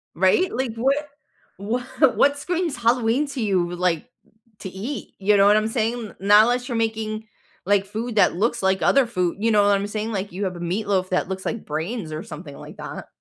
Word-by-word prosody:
Right? 190 Hz, -, +3 dB
Like, 245 Hz, -2 st, -2 dB
what 265 Hz, +4 st, +2 dB, 0.6 s
wha 225 Hz, +5 st, -2 dB, 0.3 s
what's 285 Hz, 0 st, +3 dB
screams 350 Hz, -4 st, -1 dB
Halloween 240 Hz, +3 st, +2 dB
to 275 Hz, -3 st, -4 dB
you, 180 Hz, -5 st, 0 dB
like, 175 Hz, -1 st, -1 dB, 0.5 s
to 190 Hz, -, -6 dB
eat? 210 Hz, +10 st, -6 dB
You 205 Hz, +1 st, +3 dB
know 195 Hz, -, +5 dB
what 210 Hz, +1 st, +6 dB
I'm 215 Hz, 0 st, +1 dB
saying? 225 Hz, +1 st, 0 dB
N -, -, -16 dB
not 205 Hz, +2 st, +6 dB
unless 245 Hz, +2 st, 0 dB
you're 240 Hz, -, -2 dB
making, 220 Hz, -1 st, -2 dB, 0.4 s
like, 200 Hz, 0 st, +2 dB
food 220 Hz, +4 st, -5 dB
that 205 Hz, -, +4 dB
looks 230 Hz, +4 st, 0 dB
like 190 Hz, 0 st, +2 dB
other 275 Hz, -2 st, +4 dB
food, 180 Hz, -7 st, -1 dB
you 225 Hz, +2 st, +1 dB
know 210 Hz, -1 st, +4 dB
what 205 Hz, 0 st, +4 dB
I'm 200 Hz, +1 st, -2 dB
saying? 215 Hz, +2 st, -3 dB
Like, 195 Hz, -2 st, -3 dB
you 195 Hz, +3 st, -3 dB
have 185 Hz, -1 st, -3 dB
a -, -, -8 dB
meatloaf 185 Hz, +1 st, -1 dB
that 185 Hz, 0 st, 0 dB
looks 190 Hz, 0 st, -5 dB
like 230 Hz, -, -3 dB
brains 160 Hz, +4 st, -4 dB
or 155 Hz, +2 st, -5 dB
something 150 Hz, -2 st, -9 dB
like -, -, -11 dB
that. -, -, -7 dB
210 Hz, 215 wpm, -23 LUFS, 190-235 Hz, 0.6 s, what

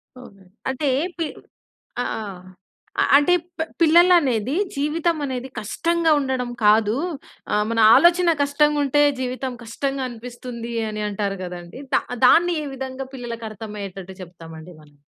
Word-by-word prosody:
అవునండి. 195 Hz, -7 st, -15 dB, 0.2 s
అంటే 270 Hz, +2 st, -2 dB, 0.3 s
పి 335 Hz, -, -1 dB, 0.8 s
ఆ! -, -, -4 dB, 1.0 s
అ -, -, +5 dB
అంటే 295 Hz, +5 st, +3 dB, 0.3 s
పి -, -, +2 dB, 0.2 s
పిల్లలనేది 315 Hz, -, +4 dB, 0.2 s
జీవితం 315 Hz, +4 st, 0 dB
అనేది 260 Hz, -1 st, -4 dB
కష్టంగా 330 Hz, +9 st, 0 dB
ఉండడం 260 Hz, -3 st, -2 dB, 0.2 s
కాదు, 215 Hz, +1 st, +4 dB, 0.6 s
ఆహ్, 210 Hz, -, +2 dB
మన 230 Hz, -, -1 dB, 0.2 s
ఆలోచన 345 Hz, 0 st, +5 dB
కష్టంగా 295 Hz, +1 st, +2 dB
ఉంటే 290 Hz, +1 st, +2 dB, 0.2 s
జీవితం 255 Hz, 0 st, -3 dB
కష్టంగా 270 Hz, +4 st, -3 dB
అనిపిస్తుంది 235 Hz, 0 st, -8 dB, 0.2 s
అని 215 Hz, 0 st, -4 dB
అంటారు 200 Hz, -1 st, -3 dB
కదండీ. 175 Hz, +6 st, -8 dB
దా -, -, +3 dB, 0.2 s
దాన్ని 345 Hz, +6 st, +5 dB
ఏ -, -, -6 dB
విధంగా 265 Hz, 0 st, -6 dB
పిల్లలకి 235 Hz, -3 st, -6 dB
అర్థమయ్యేటట్టు 195 Hz, -3 st, -8 dB
చెప్తామండి 165 Hz, -1 st, -11 dB
మనం? 145 Hz, -1 st, -21 dB
250 Hz, 125 wpm, -22 LUFS, 210-290 Hz, 1.0 s, అ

